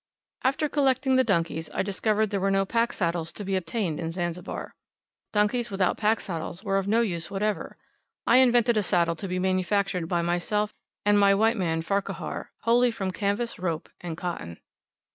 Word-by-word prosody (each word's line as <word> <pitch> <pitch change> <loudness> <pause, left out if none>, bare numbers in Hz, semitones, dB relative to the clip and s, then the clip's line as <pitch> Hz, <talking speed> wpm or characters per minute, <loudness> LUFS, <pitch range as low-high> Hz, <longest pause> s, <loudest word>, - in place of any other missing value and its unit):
After 275 +4 +2
collecting 265 -2 +2
the 260 - +5
donkeys, 165 -7 0
I - - +1
discovered 210 +2 0
there 200 - 0
were 195 +1 +1
no 195 0 +2
pack 230 +3 +1
saddles 170 -2 -1
to 210 - -7
be 195 0 0
obtained 185 -3 -2
in 165 - -2
Zanzibar. 175 0 -4 0.6
Donkeys 225 +3 +1
without 195 -2 0
pack 220 +1 +2
saddles 175 +1 -5
were 195 -2 +1
of 195 - -4
no 225 +3 +3
use 170 -7 -2
whatever. 205 +1 -2 0.5
I 235 - +5
invented 240 -2 +4
a - - +4
saddle 170 -3 +2
to 195 - -5
be 180 0 -2
manufactured 185 -1 0
by 175 -2 +1
myself 205 +5 0 0.3
and 205 0 +5
my 200 -1 +5
white 225 +3 +3
man 165 -5 -1
Farquhar, 200 +3 -3
wholly 240 +2 +4
from 195 -5 -3
canvas, 205 +5 -2
rope, 170 -3 -3
and 170 -2 -6
cotton. 170 - -5
195 Hz, 180 wpm, -26 LUFS, 175-225 Hz, 0.6 s, the